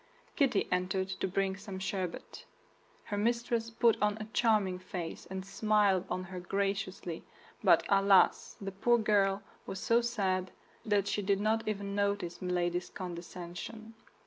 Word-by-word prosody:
Kitty 275 - +2
entered 185 +1 0
to 190 - -2
bring 190 +1 0
some 200 -1 -7
sherbet. 190 -2 -4 0.6
Her 205 - -4
mistress 235 +1 0
put 230 0 +3
on 210 0 +2
a 215 - -5
charming 210 -6 +2
face, 180 -2 -6
and 190 0 -5
smiled 200 -2 +2
on 185 - -2
her 185 0 -7
graciously; 190 -2 -2 0.4
but - - +6
alas! 195 -1 +4
the 195 -1 -4
poor 235 +5 +3
girl 200 -3 +2 0.2
was 195 - -4
so 230 +4 +3
sad 190 -6 0 0.3
that 205 -3 +2
she 205 - 0
did 195 0 +1
not 220 +2 +1
even 200 -2 -2
notice 200 -4 -1
Milady's 175 -1 -1
condescension. 180 +5 -7
195 Hz, 145 wpm, -32 LUFS, 185-215 Hz, 0.6 s, but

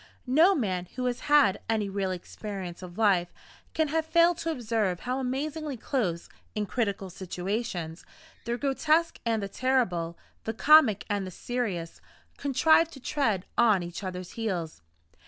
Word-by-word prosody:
No 320 +9 +5
man 185 - -1
who 250 0 -2
has 245 -1 -1
had 285 -10 +5
any 220 -2 +1
real 195 -1 -2
experience 185 0 -6
of 180 -1 -10
life 190 -5 +3 0.4
can 315 -2 +1
have 320 +2 +1
failed 340 +1 +3
to 330 - -2
observe 225 - -1
how 255 +1 -2
amazingly 285 +2 -3
close, 210 - -2 0.3
in 210 -1 -1
critical 200 -4 -2
situations, 180 -2 -4 0.4
the 235 +1 -1
grotesque 310 +5 +1
and 225 -2 +1
the - - -2
terrible, 195 -8 0 0.3
the 225 - -3
comic 270 -6 +6
and 205 -2 -1
the - - -5
serious, 190 -5 -4 0.4
contrive 315 +4 +4
to 290 - -12
tread 225 -9 0
on 215 -6 +5
each 175 +3 -7
other's 185 -1 -5
heels. 180 - -3
220 Hz, 150 wpm, -28 LUFS, 185-270 Hz, 0.4 s, comic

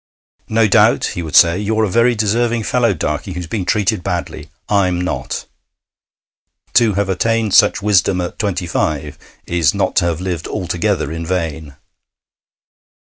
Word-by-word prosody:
'No 110 0 +3
doubt,' 95 - +3
he 90 - -4
would 80 -3 -5
say, 85 +2 +6
'you're 110 +2 0
a - - +2
very 115 +5 +2
deserving 115 +2 0
fellow, 120 0 +1
Darkey, 75 +1 -3
who's 90 0 -5
been 95 +2 -4
treated 105 0 0
badly. 90 -1 -4 0.2
I'm 95 -4 +1
not.' 90 +1 -4 1.3
To 115 -5 +3
have 100 0 0
attained 110 +2 0
such 105 -1 +4
wisdom 95 -3 +2
at 90 -1 -5
twenty 95 -4 -2
five 75 -3 -2 0.3
is 85 -4 +1
not - - -1
to - - +3
have 85 -2 -1
lived 90 -3 -4
altogether 90 -3 -2
in 80 +1 -5
vain. 80 -4 -4
95 Hz, 150 wpm, -17 LUFS, 85-105 Hz, 1.3 s, say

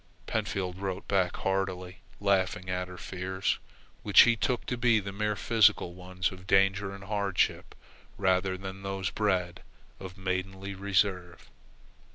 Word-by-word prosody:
Pentfield 90 -2 -2
wrote 95 -1 -4
back 95 -3 +1
heartily, 95 -1 -2 0.2
laughing 95 -2 +1
at 90 0 -2
her 90 0 -10
fears, 95 +1 -2 0.4
which 105 - +7
he 120 -1 +5
took 120 +3 -1
to 125 - -2
be 120 -2 +3
the 100 -1 -5
mere 105 +1 -1
physical 110 -4 +3
ones 90 0 -3
of 95 0 -12
danger 95 0 +3
and 100 0 -9
hardship 100 -2 -1 0.4
rather 95 -1 +1
than 95 0 -7
those 95 -1 -3
bred 90 -5 0 0.4
of 95 -1 -9
maidenly 95 +1 -3
reserve. 95 -2 -1
95 Hz, 140 wpm, -29 LUFS, 90-100 Hz, 0.4 s, which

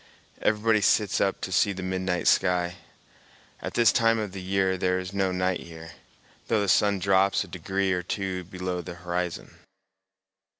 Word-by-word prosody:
Everybody 110 0 +2
sits 100 0 +2
up 95 - 0
to 95 - -4
see 100 +2 +2
the 95 0 -6
midnight 95 -1 -1
sky. 90 -1 +2 0.8
At - - -6
this 115 -2 +5
time 115 -2 +3
of 105 -3 -3
the 95 0 -7
year 95 0 +1
there 90 0 0
is 90 +1 -5
no 95 -1 0
night 90 0 0
here, 80 -1 -10 0.6
though 110 -2 +2
the 100 - -1
sun 100 +2 +3
drops 95 +1 +2
a - - -12
degree 95 0 -2
or 90 - -1
two 95 0 -3
below 90 0 -4
the 85 0 -8
horizon. 90 0 -4
95 Hz, 170 wpm, -26 LUFS, 90-100 Hz, 0.8 s, this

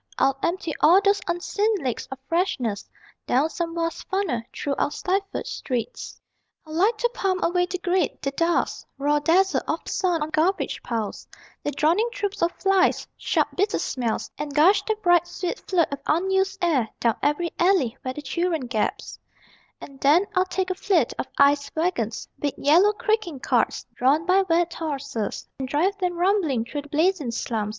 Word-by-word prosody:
I'd 270 - +3
empty 340 -2 -1
all 345 +5 +7
those 400 0 +2
unseen 405 +5 0
lakes 260 - -3
of 270 - -6
freshness 255 - -1 0.4
Down 285 +6 +2
some 335 -1 -3
vast 330 0 -3
funnel, 380 - 0
through 285 - -3
our - - +2
stifled 390 +6 -2
streets. 255 - -4 0.5
I'd 310 - -12
like 405 +8 +2
to 480 +2 0
pump 375 -5 -1
away 355 +1 +2
the 370 - -3
grit, 360 +1 0
the 275 - -2
dust, 335 +4 0
Raw 290 +2 +2
dazzle 370 +6 +3
of - - -2
the - - -6
sun 350 -5 +1
on 310 - -5
garbage 335 +5 0
piles, 225 -4 -4 0.4
The - - -1
droning 330 - +2
troops 405 -3 -4
of 340 +1 +2
flies, 390 -1 +2
sharp - - 0
bitter 405 +2 +1
smells, 230 -4 -2
And 290 -1 -5
gush 345 +7 +5
that 430 -1 -2
bright 350 -1 +4
sweet 355 +4 -4
flood 345 -5 +2
of 280 - -4
unused 385 +4 +1
air 275 -10 +2
Down 230 -2 +1
every 330 +4 0
alley 345 -10 +3
where 255 0 -4
the 295 - -7
children 325 +1 -1
gasp. 230 -3 -3 0.6
And 275 -1 -12
then 305 +9 +4
I'd 370 0 +1
take 375 -1 -1
a - - +1
fleet 360 - +1
of - - -2
ice 280 0 +4
wagons 315 - -1
Big 290 -2 -2
yellow 350 +9 +5
creaking 430 - -1
carts, - - 0
drawn 285 +6 +2
by 370 +2 +4
wet 340 +1 +2
horses, 280 -9 -4
And 265 - -3
drive 330 +9 +1
them 360 -2 -1
rumbling 345 - +1
through 290 +4 -4
the 290 - -16
blazing 315 -2 +1
slums. 225 -2 -2
335 Hz, 175 wpm, -24 LUFS, 280-375 Hz, 0.6 s, all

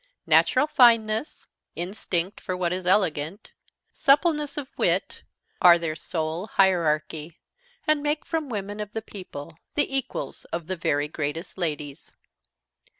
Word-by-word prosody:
Natural - - +4
fineness, 230 -3 +3 0.3
instinct 180 0 -2
for 185 - -3
what 180 -1 0
is 185 -1 -4
elegant, 180 -1 0 0.4
suppleness 295 0 +2
of 285 -3 -4
wit, - - 0 0.4
are 175 -1 +8
the 165 -2 -3
sole 160 +3 -3
hierarchy, 160 -4 +1 0.5
and 305 -1 +3
make 295 +1 -1
from 320 -4 -2
women 205 -2 -4
of 210 0 -5
the 225 - -4
people 165 -6 -9 0.2
the 290 -2 +1
equals 270 - -4
of 170 -1 -5
the 185 - -3
very 145 -3 0
greatest 155 +3 -4
ladies. 150 -5 -4
185 Hz, 130 wpm, -25 LUFS, 160-230 Hz, 0.5 s, are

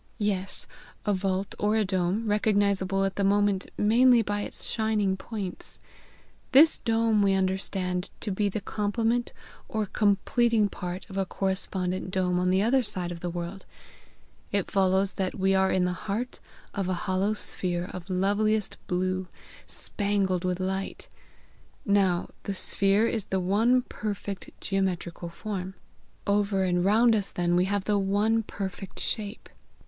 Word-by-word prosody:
"Yes; 200 -3 -1 0.4
a 205 - +2
vault 190 0 -1
or 210 +1 +2
a 220 -1 +2
dome, 190 +3 0
recognizable 200 -2 +2
at 195 - -3
the 200 - +1
moment 200 -1 +2
mainly 235 +3 +5
by 205 0 -2
its - - -6
shining 215 -4 +1
points. 195 -2 -5 0.8
This 305 +4 +7
dome 225 -2 +2
we 195 -1 +3
understand 185 -1 -1
to 210 - -2
be 205 +2 +1
the 205 +2 -3
complement 225 +4 0 0.4
or 215 -1 -1
completing 210 +2 +2
part 180 -1 -6
of 195 -2 -8
a 195 - +1
correspondent 185 -1 -2
dome 180 -1 +1
on 180 0 +1
the 190 +2 +3
other 260 +4 +4
side 180 -6 -3
of 170 - -6
the 175 - -3
world. 175 +3 -6 0.8
It 200 -2 -1
follows 190 0 +2
that 190 -2 -2
we 190 0 +2
are 190 0 +3
in 185 -1 +2
the 180 - 0
heart 215 +7 -4 0.3
of 195 -2 -2
a 185 - +1
hollow 190 +3 +1
sphere 175 -4 -2
of 180 0 -8
loveliest 205 +3 +1
blue, 185 +1 -1 0.4
spangled 200 -3 -1
with 180 0 -1
light. 190 +1 -3 0.8
Now 195 -4 +2 0.2
the 200 - -2
sphere 200 +3 +2
is 225 -3 -1
the 190 - 0
one 225 +7 +3
perfect 200 -4 -5
geometrical 180 -3 -2
form. 190 0 -5 0.5
Over 200 -1 +2
and 180 -1 +1
round 225 +4 +5
us 200 -2 0
then 175 0 0
we 180 +1 +3
have 200 0 0
the 205 0 +1
one 205 +3 +2
perfect 195 -2 -6
shape. 210 0 -3
195 Hz, 150 wpm, -27 LUFS, 185-210 Hz, 0.8 s, This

